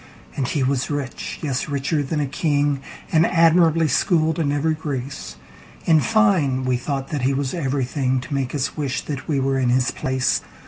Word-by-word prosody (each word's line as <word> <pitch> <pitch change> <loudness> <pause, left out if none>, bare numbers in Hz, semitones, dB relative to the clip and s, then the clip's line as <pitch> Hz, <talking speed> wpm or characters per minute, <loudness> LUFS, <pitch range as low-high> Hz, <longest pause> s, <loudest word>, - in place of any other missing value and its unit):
And 135 -3 -1
he 140 +1 0
was 130 -1 0
rich—yes, 140 0 -3
richer 145 +2 0
than 145 +2 -2
a 145 - +1
king—And 145 +2 0
admirably 165 -1 +4
schooled 160 +2 +2
in 145 -3 +1
every 150 +2 +1
grace:In 140 - -3
fine, 180 -13 +2
we 130 -1 +2
thought 135 +2 -3
that 150 -3 -2
he 135 +2 +1
was 135 -1 -2
everythingTo 135 -3 -1
make 135 -1 -1
us 140 -2 -2
wish 140 -4 -2
that 140 -2 -6
we 145 -3 +1
were 135 0 +1
in 125 -2 +1
his 125 +1 +2
place. 130 -1 0
140 Hz, 165 wpm, -22 LUFS, 130-155 Hz, -, admirably